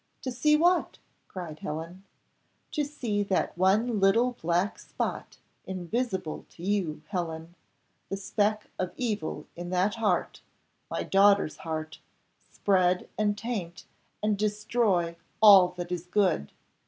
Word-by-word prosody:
"To 255 - -2
see 300 +5 +3
what?" 350 +2 +2 0.3
cried 170 -5 -7
Helen. 165 +6 -6 0.7
"To 300 - 0
see 245 -8 -2
that 195 -2 0
one 205 +5 +2
little 225 +6 +4
black 175 +4 0
spot, - - -4 0.3
invisible 190 -1 -3
to 170 - -13
you, 180 -6 -1
Helen, 165 -3 -4 0.6
the 195 - -2
speck 210 +2 -1
of 185 -1 -2
evil 210 -11 -2
in 175 +1 -6
that 185 +3 +1
heart 210 -6 0 0.5
my - - -2
daughter's 200 -4 +4
heart 155 -1 -5 0.5
spread 185 -2 +2
and 205 -1 +1
taint, 205 -8 -5 0.4
and 210 -1 +1
destroy 210 -5 +1 0.2
all 200 -4 +9
that 175 0 -5
is 180 0 -4
good. 180 - +1
195 Hz, 125 wpm, -28 LUFS, 175-215 Hz, 0.7 s, all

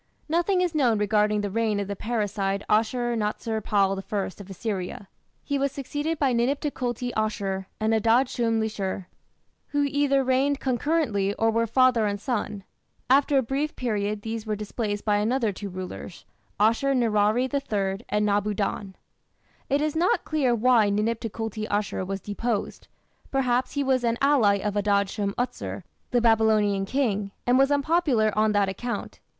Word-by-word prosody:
Nothing 345 +4 +1
is 355 -2 0
known 250 -8 +3
regarding 210 0 +2
the 205 -1 -3
reign 220 -1 0
of 200 - -3
the 200 - -4
parricide 205 -3 -2
Ashur 240 +2 +1
natsir 220 0 -2
pal 195 -2 +2
I 205 -2 0 0.2
of 200 - -12
Assyria. 195 -1 -4 0.4
He 285 -1 -1
was 280 0 0
succeeded 290 +4 -3
by 275 -4 +2
Ninip 245 +4 +1
Tukulti 250 -4 -3
Ashur 195 -3 -2
and 220 +1 +1
Adad 230 +4 +3
shum 230 -2 0
lishir, 200 -4 -3 0.6
who 290 0 0
either 280 -1 +2
reigned 265 +2 +1
concurrently 245 -7 0
or 225 0 +2
were 230 +1 +1
father 245 -2 +3
and 205 0 -2
son. 210 -4 -3 0.5
After 280 +1 +4
a 265 - +3
brief 275 +5 -2
period 210 -3 -2
these 225 0 -4
were 215 - 0
displaced 210 0 -4
by 210 -1 +3
another 225 +1 +1
two 200 +1 -7
rulers, 185 -1 -8 0.3
Ashur 230 +6 +3
nirari 225 +1 +2
III 205 -7 -1
and 210 0 +1
Nabu 205 0 +1
dan. 195 -1 -3 0.7
It 280 +2 +2
is 305 0 -1
not 345 +3 +1
clear 275 -6 +1
why 230 -2 +4
Ninip 215 +3 0
Tukulti 225 -1 -4
Ashur 205 -2 -1
was 195 +1 -4
deposed. 210 +1 -3 0.4
Perhaps 255 -2 0
he 285 -1 0
was 260 -2 +1
an 235 0 +1
ally 270 -8 +4
of 205 +1 -2
Adad 200 -1 +1
shum 200 -1 -2
utsur, 245 +1 -3 0.3
the 245 -2 +2
Babylonian 215 -3 +3
king, 210 -6 0 0.2
and 245 +1 +4
was 270 +1 +4
unpopular 285 - +2
on 215 0 +2
that 205 -1 +3
account. 240 +5 -5
225 Hz, 165 wpm, -25 LUFS, 205-260 Hz, 0.7 s, After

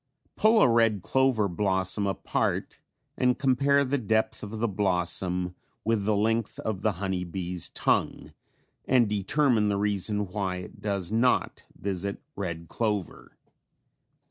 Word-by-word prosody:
Pull 220 +1 +4
a - - +6
red 115 -5 +3
clover 130 -5 +2
blossom 95 +1 0
apart 95 - -2 0.3
and 125 -1 +2
compare 140 +2 +3
the 140 +2 0
depth 110 -1 0
of 105 +1 -6
the 115 +2 0
blossom 90 -2 -1 0.3
with 110 -2 +1
the 105 0 +2
length 110 +1 0
of 110 -4 -3
the 110 - +1
honey 95 0 -2
bee's 90 0 -4
tongue, - - -1 0.5
and 125 -3 +4
determine 105 +2 +2
the 100 - 0
reason 105 0 0
why 95 -1 -3
it 90 - -9
does 100 -3 -2
not 120 +3 +1
visit 100 0 -3 0.2
red 85 -4 -4
clover. 105 -4 -3
105 Hz, 135 wpm, -27 LUFS, 95-115 Hz, 0.5 s, a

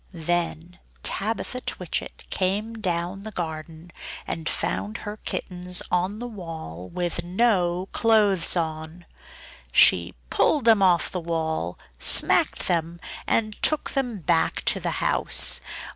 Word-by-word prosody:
Then 175 +1 -3 0.2
Tabitha 225 +4 0
Twitchit - - -5
came 200 +4 -1
down 185 -3 -3
the 220 - -7
garden 160 -2 -6 0.3
and 160 -1 -3
found 215 +2 -2
her 210 +1 -5
kittens 180 -3 -1
on 185 +3 0
the 240 - -6
wall 165 - -8
with 175 -1 -3
no 180 -2 +1
clothes 205 -6 +3
on. 160 +1 -4 0.7
She 85 +6 +5 0.2
pulled 290 -6 +2
them 225 -3 +6
off 180 -3 +3
the 180 - -3
wall, 160 - -2 0.2
smacked - - +4
them, 170 -1 -1 0.3
and 215 -2 0
took 310 -1 +2
them 250 -5 -2
back 160 +2 +1
to - - +3
the - - -2 0.2
house. - - +3
180 Hz, 125 wpm, -25 LUFS, 165-210 Hz, 0.7 s, them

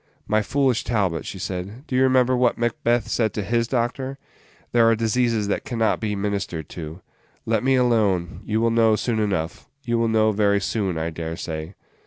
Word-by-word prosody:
"My 110 0 +2
foolish 130 +1 +1
Talbot," 95 - -1
she - - -6
said, 95 +7 -5
"do 130 - -4
you 130 - +3
remember 130 -1 +4
what 125 -1 +2
Macbeth 120 0 0
said 110 -2 0
to 105 - -1
his 115 +2 0
doctor? 130 +2 -2 0.5
There 115 -1 +5
are 115 - +4
diseases 115 -1 +1
that - - -1
can 120 - -5
not 115 -1 +2
be 105 -2 -2
ministered 100 -6 -3
to. 80 +1 -8 0.4
Let 110 0 +1
me 135 0 +3
alone; 105 -9 +1
you 110 +1 -1
will 115 0 +2
know 115 -1 +4
soon 110 +1 -1
enough 95 -5 -2 0.2
you 120 -3 0
will 115 - +2
know 110 -1 +3
very 100 -1 +2
soon, 100 -3 -1
I 80 +1 -2
dare 80 0 -5
say." 80 +1 -5
110 Hz, 195 wpm, -23 LUFS, 100-120 Hz, 0.5 s, There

